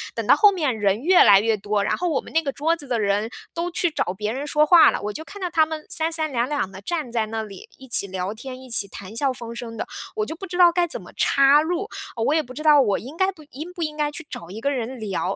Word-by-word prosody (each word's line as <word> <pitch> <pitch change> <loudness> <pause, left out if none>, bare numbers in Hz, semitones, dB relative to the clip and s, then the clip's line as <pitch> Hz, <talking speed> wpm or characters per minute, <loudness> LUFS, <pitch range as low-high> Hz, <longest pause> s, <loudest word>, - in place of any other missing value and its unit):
等 - - -3
到 - - +7
后 415 -2 +6
面 295 - -1
人 205 +2 +1
越 365 +1 +6
来 195 -1 +7
越 225 +1 +1
多， 205 0 -1
然 - - 0
后 355 -1 -1
我 290 - 0
们 - - -13
那 325 - +3
个 280 -4 -3
桌 315 +5 0
子 295 -5 -8
的 240 -2 -1
人， 205 +1 0 0.2
都 340 +1 -2
去 345 0 +1
找 180 - -2
别 210 +3 -3
人 275 +4 -4
说 300 +1 +3
话 335 +2 +7
了。 - - -4
我 210 0 -4
就 315 - -6
看 405 +4 -11
到 360 - -2
他 320 -2 +3
们 310 -1 -7
三 325 -1 0
三 315 -2 +2
两 240 -1 0
两 290 -10 -1
地 190 0 -10
站 305 - -3
在 225 -2 -1
那 220 0 -3
里， 200 -3 -11
一 265 - -14
起 210 -4 0
聊 190 +1 -4
天， 255 +3 -9
一 260 - -13
起 210 -4 +1
谈 195 +2 -10
笑 275 +1 +1
风 235 -2 -8
生 230 -1 -7
的， - - -4 0.3
我 430 - -1
就 320 - -6
不 385 +4 -8
知 355 0 -5
道 350 -1 +7
该 345 0 +1
怎 - - -4
么 - - -13
插 275 +2 +4
入。 355 +6 -2 0.3
呃， 225 - -2
我 285 - +2
也 320 - +3
不 255 - -11
知 305 - -7
道 300 -2 +6
我 205 -6 +1
应 270 +7 -10
该 380 0 +2
不 320 -4 -16
应 310 +7 -8
不 345 - -4
应 305 -1 -3
该 295 -1 0
去 320 +2 -8
找 170 - -8
一 210 +4 -7
个 280 - 0
人 255 -1 -4
聊。 205 -4 -3
275 Hz, 325 characters per minute, -23 LUFS, 220-320 Hz, 0.3 s, 到